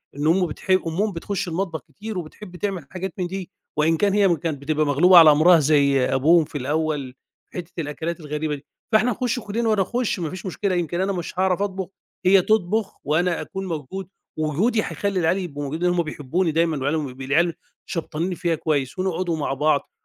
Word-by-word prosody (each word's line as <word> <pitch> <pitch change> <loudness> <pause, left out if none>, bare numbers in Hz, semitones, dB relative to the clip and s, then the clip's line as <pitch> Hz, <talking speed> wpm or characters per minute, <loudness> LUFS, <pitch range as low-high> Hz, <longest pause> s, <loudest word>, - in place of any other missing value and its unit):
إن 145 +2 -1
أمه 180 +2 +3
بتح 150 - -10
أمهم 185 +3 +2
بتخش 190 +3 -3
المطبخ 170 -1 -3
كتير 210 +8 -7
وبتحب 180 +3 -8
تعمل 185 -5 -3
حاجات 185 -1 -5
من 180 -2 -1
دي، 190 0 -6 0.3
وإن 160 +2 +3
كان 200 +1 +2
هي 195 -4 +4
كانت 150 -2 -4
بتبقى 155 +1 0
مغلوبة 175 +6 +6
على 160 -2 +10
أمرها 160 +3 +6
زي 140 -2 +3
أبوهم 155 +6 +4
في 145 - -6
الأول 145 -1 -2 0.4
حتة 180 -1 -6
الأكلات 160 +3 -4
الغريبة 150 -1 -3
دي، 145 0 -13 0.3
فإحنا 220 +3 +4
نخُش 245 +2 -1
كلنا 225 +1 -2
وأنا 215 -2 +3
أخُش 240 +1 -1
ما 165 -3 -2
فيش 185 +4 -8
مشكلة 190 +1 -1
يمكن 175 0 -1
أنا 195 +1 0
مش 180 0 -5
هاعرف 190 0 +2
أطبخ 190 -2 -2 0.4
هي 190 +1 +6
تطبخ 215 +1 0
وأنا 170 +4 +1
أكون 195 -1 -6
موجود 170 +2 -5 0.3
ووجودي 170 - +1
هيخلي 200 -2 -2
العيال 175 +2 +2
يبقوا 150 -6 -5
موجودين 160 +6 -1
هُم 175 -1 +1
بيحبوني 160 +3 -1
دايمًا 165 0 +1
وعيالهم 145 +1 -1
العيال 165 +6 +2 0.3
شبطانين 170 +1 -3
فيّا 170 -1 0
كويس 145 0 -1
ونقعدوا 180 -2 -1
مع 145 - -1
بعض، 145 +1 +1
170 Hz, 185 wpm, -23 LUFS, 155-190 Hz, 0.4 s, على